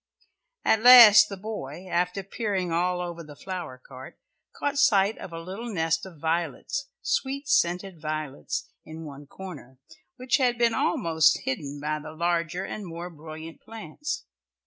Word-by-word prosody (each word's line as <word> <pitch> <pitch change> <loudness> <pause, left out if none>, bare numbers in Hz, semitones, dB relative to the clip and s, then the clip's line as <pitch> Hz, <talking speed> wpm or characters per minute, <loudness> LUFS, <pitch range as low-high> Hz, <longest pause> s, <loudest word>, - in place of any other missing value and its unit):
At 220 - +3
last 240 -3 +10
the 200 - -6
boy, 185 -5 -7
after 180 +2 -1
peering 195 -3 -2
all 180 +2 0
over 170 -1 -6
the 150 -2 -12
flower 180 -7 -6
cart, 130 0 -12 0.4
caught 285 0 -1
sight 210 -7 +4
of 185 - -8
a 165 - -6
little 195 +8 -7
nest 165 -1 0
of 175 -4 -13
violets 165 - -2 0.2
sweet 280 - -1
scented 180 - +1
violets 155 - -4
in 160 +1 -9
one 145 -1 -10
corner, 150 -8 -10 0.4
which 255 -1 +1
had 250 -3 +1
been 235 -1 +3
almost 160 -4 +2
hidden 140 +2 -4
by 155 +1 -2
the 155 +1 -9
larger 170 +2 -1
and 205 -1 -6
more 170 +1 -7
brilliant 160 +1 -10
plants. 295 - -6
175 Hz, 150 wpm, -26 LUFS, 155-210 Hz, 0.4 s, last